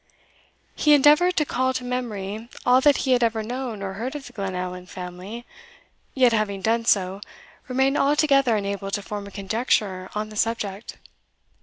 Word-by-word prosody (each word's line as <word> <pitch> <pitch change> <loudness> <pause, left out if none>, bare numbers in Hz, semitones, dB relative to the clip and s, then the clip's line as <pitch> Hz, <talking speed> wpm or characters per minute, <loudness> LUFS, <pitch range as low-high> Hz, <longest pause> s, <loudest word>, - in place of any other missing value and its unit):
He 300 -1 +5
endeavoured 300 +6 +5
to 300 - +3
call 260 -1 0
to 255 - -2
memory 225 -3 -4 0.2
all 250 +1 +5
that 290 0 +5
he 260 - +1
had 250 -1 +4
ever 225 -1 +1
known 240 -3 -5
or 195 -1 -4
heard 240 +8 -5
of 285 -2 -6
the 245 - -12
Glenallan 180 -3 -4
family, 185 +7 -8 0.7
yet, 250 -3 +4
having 200 -3 -1
done 230 +1 +1
so, 195 -2 +1 0.5
remained 265 +2 +1
altogether 275 -4 +3
unable 200 -1 -3
to 205 +1 -2
form 205 0 -6
a - - -11
conjecture 200 -2 -1
on 215 0 -2
the 215 - -11
subject. 210 -1 -2
225 Hz, 165 wpm, -24 LUFS, 200-255 Hz, 0.7 s, He